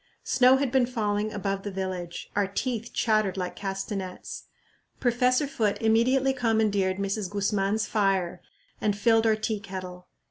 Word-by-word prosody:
Snow 255 +1 +5
had 270 -2 -1
been 255 -2 +3
falling 215 -3 -1
above 195 -2 -2
the 205 - -5
village; 185 -3 -5
our 205 -1 +2
teeth 230 +3 -3
chattered 215 -4 +1
like 180 -1 -3
castanets. 195 -1 -5 0.5
Professor 250 +2 +2
Foote 220 -7 -1
immediately 255 +4 +3
commandeered 215 -6 +1
Mrs. 200 0 -2
Guzman's 205 +1 0
fire 195 -4 0 0.4
and 205 -1 +1
filled 225 +1 +3
our 220 - +4
tea 215 0 -2
kettle. 185 -2 -8
205 Hz, 140 wpm, -27 LUFS, 195-230 Hz, 0.5 s, Snow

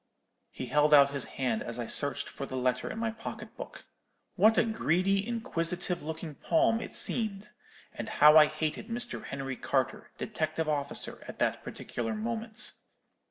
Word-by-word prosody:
"He - - -6
held 150 0 +4
out 140 -1 +7
his 140 -3 -1
hand 125 -4 0
as 115 0 -5
I 120 - -3
searched 140 +5 +2
for 140 - -7
the 130 - -6
letter 125 0 0
in - - -6
my 225 0 -1
pocket 225 0 -8
book. - - -9 0.5
What 220 +1 +5
a - - +6
greedy, 195 -2 +1
inquisitive 180 -7 -2
looking 160 0 -6
palm 275 - +2
it - - -5
seemed! 210 -3 0 0.4
and - - -6
how 150 +1 +7
I 155 -1 +9
hated 155 +5 -3
Mr. 240 +1 -3
Henry 135 -2 -5
Carter, - - -1
detective 155 0 -2
officer, 145 -2 -1
at - - -8
that - - 0
particular 225 - -4
moment! 225 0 -2
165 Hz, 160 wpm, -30 LUFS, 145-220 Hz, 0.5 s, I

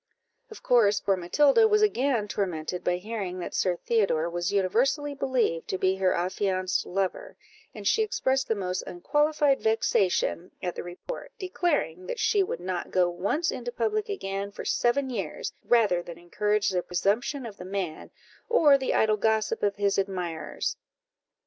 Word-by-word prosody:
Of 440 - -12
course, 210 -4 +4
poor 195 -1 +1
Matilda 280 - +4
was 425 0 +3
again 260 - +1
tormented 180 -4 -3
by 180 - +1
hearing 195 -2 -5
that 175 - -6
Sir 180 -2 +1
Theodore 175 -6 0
was 175 0 -2
universally 250 +10 +1
believed 260 -11 0
to 190 - -2
be 190 +1 +1
her 190 -1 +2
affianced 185 +1 -1
lover, 190 0 -3 0.4
and 205 -2 -4
she 445 - +3
expressed 270 -11 0
the 225 - +1
most 185 -2 -2
unqualified 295 - +1
vexation 190 -5 +1
at 180 -1 -3
the - - -5
report, 180 - -8
declaring 340 - -1
that - - -4
she 430 -4 +2
would 380 - -2
not 180 -1 -3
go 180 -1 +2
once 200 - -1
into 485 - -5
public 430 -3 -1
again 200 - -3
for - - -8
seven 260 +2 +1
years, 215 -6 -4
rather 210 -7 +3
than 170 -1 -9
encourage 210 +4 0
the 185 -2 0
presumption 210 +10 -1
of 210 -3 -8
the - - -8
man, 185 -4 -4 0.4
or 300 - +5
the 265 - -1
idle 215 -1 +3
gossip 220 0 +1
of 200 -1 +1
his 200 -1 +1
admirers. 180 -5 -3
205 Hz, 160 wpm, -27 LUFS, 180-270 Hz, 0.4 s, or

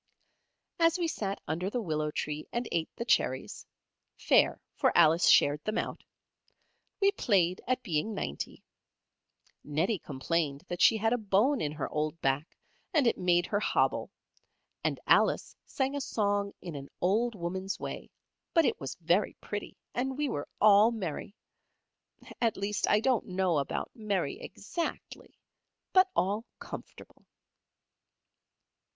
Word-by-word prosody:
As 330 +1 +4
we 345 -2 0
sat 200 -10 -3
under 175 +5 -1
the 245 - -2
willow 155 -7 -1
tree 150 0 -4
and 240 0 -2
ate 165 -1 0
the 235 - -4
cherries 130 - 0 0.5
(fair, - - +3 0.2
for - - +3
Alice 165 0 +6
shared 145 +1 +5
them 215 - -2
out), - - -3 1.0
we 395 -1 +4
played 185 - +1
at 255 0 0
being 195 +2 -1
ninety. 70 - -5 1.0
Nettie 165 +8 0
complained 145 0 -2
that 175 - -3
she 225 - +6
had 225 +2 +1
a 245 - +1
bone 220 +7 +2
in 150 - -1
her 150 -3 -3
old 155 +2 -2
back 135 +3 -1 0.4
and 290 -4 +4
it 235 - +3
made 175 -1 +3
her 205 - 0
hobble, - - +1 0.7
and - - 0
Alice - - +3
sang 270 +1 -1
a 285 - -2
song 205 -4 0
in 175 -3 -6
an 140 0 -7
old 220 +6 +1
woman's 190 +2 -4
way, - - -6 0.5
but 330 -2 +5
it - - 0
was 135 - -5
very 175 +5 +2
pretty, 205 0 -6 0.2
and 265 +2 -2
we 295 0 0
were 145 - -3
all 210 +1 +7
merry. 200 -3 -5 1.1
At 230 -2 +2
least 200 +1 -1
I 210 - +4
don't 255 -2 +1
know 185 -4 +1
about 140 - -3
merry 215 - -2
exactly, 345 -7 -6 0.6
but 375 0 +6
all 205 +4 +1
comfortable. - - -10
200 Hz, 145 wpm, -30 LUFS, 165-235 Hz, 1.1 s, all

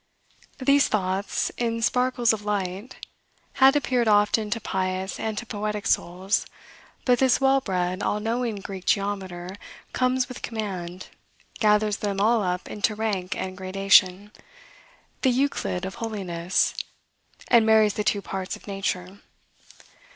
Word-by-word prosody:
These 275 +1 +4
thoughts, 190 -1 -1
in 230 -1 -1
sparkles 250 -1 +2
of 210 -1 -5
light, 200 +2 -4 0.6
had 270 +2 +7
appeared 250 -5 +1
often 210 +1 +3
to 230 +2 -1
pious 190 -1 -3
and 220 -1 -3
to 240 - -4
poetic 210 -2 -4
souls; 185 +3 0 0.6
but 245 -2 +3
this 260 -2 +4
well 270 0 +3
bred, 185 -2 -2
all 210 - 0
knowing 230 +1 -1
Greek 190 -2 -7
geometer 190 -2 -2 0.4
comes 255 0 +1
with 250 - -9
command, 185 -5 -5 0.5
gathers 210 -1 +3
them 200 -2 -2
all 225 +2 +3
up 180 -2 -2
into 210 +1 -1
rank 205 -4 -2
and 185 0 -4
gradation, 190 +1 +3 0.9
the 265 - +3
Euclid 250 -8 0
of 190 - -5
holiness, 185 -5 -1 0.8
and 235 -2 +6
marries 220 -1 +4
the 210 - -2
two 200 -1 0
parts 190 -1 -4
of - - -15
nature. 195 -1 -3
205 Hz, 135 wpm, -25 LUFS, 190-230 Hz, 0.9 s, had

